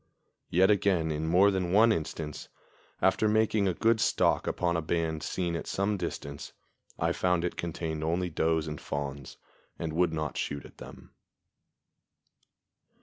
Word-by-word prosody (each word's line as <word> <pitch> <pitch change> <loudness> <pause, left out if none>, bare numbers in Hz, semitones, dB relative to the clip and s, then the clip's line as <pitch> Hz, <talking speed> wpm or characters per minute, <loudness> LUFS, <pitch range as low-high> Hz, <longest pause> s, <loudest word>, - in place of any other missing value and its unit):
Yet 95 +4 +4
again 95 -6 +2
in 75 +1 -2
more 95 +5 +5
than 90 -2 -1
one 110 +4 +6
instance, 80 -4 -4 0.5
after 95 +3 +3
making 110 -1 +2
a 90 - 0
good 115 -1 +2
stalk - - +2
upon 85 -1 0
a 85 - 0
band 80 -1 -1
seen 85 +2 -2
at - - -5
some 100 +2 0
distance, 70 -6 -6 0.4
I - - +1
found 90 -2 +1
it 90 - -3
contained 80 -2 -4
only 85 +2 -1
does 80 0 +1
and 75 -1 -6
fawns, 70 -1 -5 0.4
and 80 -2 -4
would 85 0 +2
not 75 -3 -3
shoot 70 -2 -3
at - - -15
them. - - -12
85 Hz, 150 wpm, -29 LUFS, 80-95 Hz, 0.5 s, one